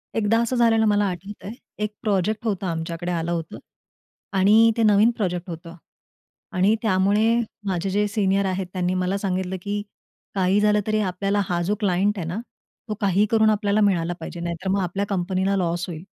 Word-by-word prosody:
एकदा 225 +1 +2
असं 235 +2 -1
झालेलं 225 -2 +4
मला 205 -1 +3
आठवतंय. 195 +4 -7 0.3
एक 210 0 -2
प्रोजेक्ट 210 +1 0
होतं 200 -3 -1
आमच्याकडे 165 +1 -3
आलं 170 0 -2
होतं 165 -2 -4 0.8
आणि 215 +4 +6
ते 230 - +2
नवीन 210 +2 +5
प्रोजेक्ट 180 -3 -2
होतं 165 0 -8 0.8
आणि 190 +4 +3
त्यामुळे 205 +1 +2 0.4
माझे 185 0 -1
जे 205 +2 +1
सीनियर 200 -1 +1
आहेत, 190 -1 -2
त्यांनी 180 -1 0
मला 185 +1 0
सांगितलं, 190 -1 -2
की 205 +2 -3 0.5
काही 190 +1 +2
झालं 210 0 +3
तरी 215 0 +1
आपल्याला 195 +3 0
हा 175 -1 0
जो 195 +5 0
क्लायंट 200 +1 +1
आहे 170 -4 -4
ना, 180 +6 -3 0.5
तो - - 0
काही 200 +1 +3
करून 220 -1 +4
आपल्याला 210 0 +1
मिळाला 175 -4 +2
पाहिजे. 175 - -7
नाहीतर 170 +2 -4
मग 195 +1 +1
आपल्या 190 +3 -2
कंपनीला 190 0 0
लॉस 175 -1 -1
होईल. 165 -1 -7
195 Hz, 175 wpm, -23 LUFS, 180-210 Hz, 0.8 s, आणि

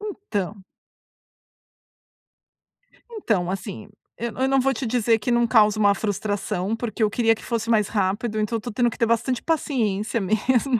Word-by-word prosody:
então 215 - -4 2.5
então 190 - 0
assim, 205 +1 -6 0.3
eu 235 0 -4
eu 260 - +1
não 270 0 +3
vou 270 +1 +2
te 250 - -4
dizer 230 -1 +2
que 240 +4 -2
não 235 0 +3
causa 215 -2 +4
uma 205 -1 +4
frustração, 205 -1 -2
porque 225 -1 -5
eu 210 - +3
queria 225 +1 +2
que - - -14
fosse 230 -1 -2
mais 215 -3 +3
rápido, 210 +2 -1
então 215 +2 0
eu - - -7
tô 240 - -6
tendo 240 +2 +2
que - - -9
ter 235 - +2
bastante 230 +2 0
paciência 230 -9 0
mesmo. 240 +5 +1
225 Hz, 165 wpm, -23 LUFS, 210-240 Hz, 2.5 s, causa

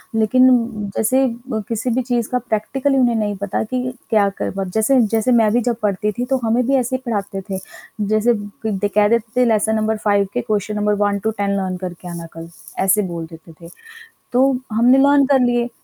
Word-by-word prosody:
लेकिन 255 +4 +4
उम, 230 -4 0
जैसे 260 +5 +2 0.2
म 220 -3 -2
किसी 230 +4 -2
भी 255 +2 +1
चीज़ 240 -2 -1
का 250 - 0
प्रैक्टिकल 250 +5 -1
उन्हें 245 -3 +3
नहीं 210 -2 -1
पता 200 0 -2
कि 250 +3 -3 0.3
क्या 210 -3 +3
करवा 195 0 -3
जैसे 235 +4 +3
जैसे 225 +3 +2
मैं 225 -3 +4
भी 245 - +3
जब 235 0 0
पढ़ती 210 +1 0
थी, 245 +4 -4
तो 265 0 0
हमें 230 +2 +1
भी 275 - +1
ऐसे 255 0 0
ही 260 - -4
पढ़ाते 200 -4 -3
थे। 190 - -2 0.5
जैसे 215 +2 +3 0.3
क - - +1 0.2
द - - +1
कह 210 0 +5
देते 235 +1 0
थे - - +5
लेसन 220 -1 +2
नंबर 220 0 0
5 205 -1 +2
के 245 - -1
क्वेश्चन 210 -2 -2
नंबर 210 0 +1
1 205 0 +1
टू 220 +2 -1
10 200 0 0
लर्न 185 -1 -2
करके 180 -1 -7
आना 170 -1 -7
कल, 165 0 -9 0.3
ऐसे 195 +2 +3
बोल 165 -1 -5
देते 165 +1 -13 0.2
थे। - - -13 0.6
तो 250 +1 +3 0.3
हमने 240 +4 +4
लर्न 280 0 +5
कर 275 -2 +4
लिए। 240 -1 +1
220 Hz, 215 wpm, -19 LUFS, 205-245 Hz, 0.6 s, कह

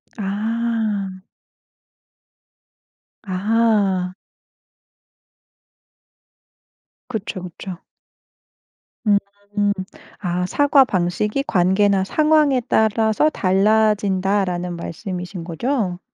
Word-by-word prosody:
아. 215 -1 -2 2.0
아. 200 -2 +1 3.0
그쵸 210 -4 -4
그쵸. 180 +1 -8 1.3
음. 205 -1 +5 1.0
아 180 -1 -1
"사과 285 +1 +4
방식이 210 +5 -1
관계나 190 +2 +3
상황에 300 +1 +3
따라서 220 +6 +2
달라진다."라는 195 - +1
말씀이신 180 +1 -6
거죠? 185 - -2
200 Hz, 125 characters per minute, -21 LUFS, 185-220 Hz, 3.0 s, 음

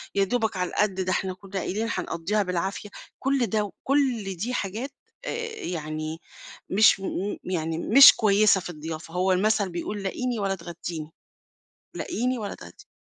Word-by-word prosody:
يا 200 - +4
دوبك 220 -1 0
على 180 -1 -1
القد 210 -2 +1
ده 185 - -1
إحنا 185 0 -1
كنّا 195 +1 -6
قايلين 215 +5 -2
هنقضّيها 185 +3 -1
بالعافية، 180 +1 -3 0.3
كل 270 -2 +1
ده 215 -1 +1
وكل 235 -2 -1
دي 225 +9 -3
حاجات، 225 +5 -3 0.3
آآ، - - -2 0.3
يعني 155 - -4 0.5
مش 210 +1 +5
م 195 - -3 0.3
يعني 165 -3 -2
مش 270 +10 +9
كويّسة 205 -2 +4
في - - -7
الضيافة، 160 0 -7
هو 185 +1 +2
المثل 200 +1 +2
بيقول 195 +4 -4
لاقيني 240 +4 -2
ولا 195 -1 0
تغدّيني 170 -2 -7 0.8
لاقيني 250 +3 -1
ولا 210 -3 -5
تغدّيني، 415 - -14
195 Hz, 150 wpm, -26 LUFS, 175-220 Hz, 0.8 s, مش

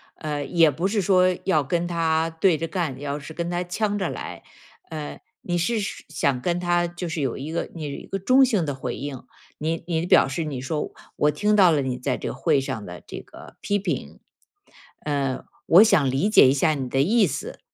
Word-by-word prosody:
呃， 150 -2 -4
也 165 -1 +4
不 170 +7 -1
是 205 +1 0
说 185 -1 +3
要 180 -6 +2
跟 170 +5 -1
他 165 -1 +1
对 165 +1 +2
着 165 - -3
干， 160 -6 -2
你 140 - -10
要 145 0 -3
是 150 +2 -10
跟 170 +1 -3
他 175 0 -1
呛 205 +3 -1
着 190 -4 -1
来。 - - -7 0.5
呃， 155 -2 -6 0.2
你 175 -1 -2
是 220 +7 0
是 195 -1 -5
想 140 -4 0
跟 175 +5 0
他 175 -1 +1
就 175 0 -6
是 160 -1 -3
有 135 - -1
一 145 +4 -6
个 170 - -3
你 165 - -7
有 - - -4
一 - - -8
个 195 - -3
中 255 +7 +5
性 210 -10 +1
的 145 - -2
回 125 -2 -4
应， 135 -2 -6 0.3
你 160 +2 -2
你 165 -1 -1
表 180 - +5
示 135 +5 -3
你 140 -5 -4
说： 150 +3 -3 0.3
“我 150 - +3
听 210 +8 +1
到 190 -4 +6
了 150 -3 +2
你 130 -2 -2
在 130 +1 -2
这 - - -5
个 - - -4
会 135 +1 +2
上 110 -5 -5
的 90 -1 -9
这 - - -7
个 - - -14
批 205 0 0
评。 200 - -4 0.9
嗯， 140 -3 -1 0.2
我 180 +6 +8
想 180 -11 +3
理 140 +11 +1
解 210 - +7
一 130 - +4
下 155 +3 +2
你 135 -3 -3
的 135 +2 +1
意 210 +8 +4
思， - - -5
165 Hz, 245 characters per minute, -24 LUFS, 140-180 Hz, 0.9 s, 我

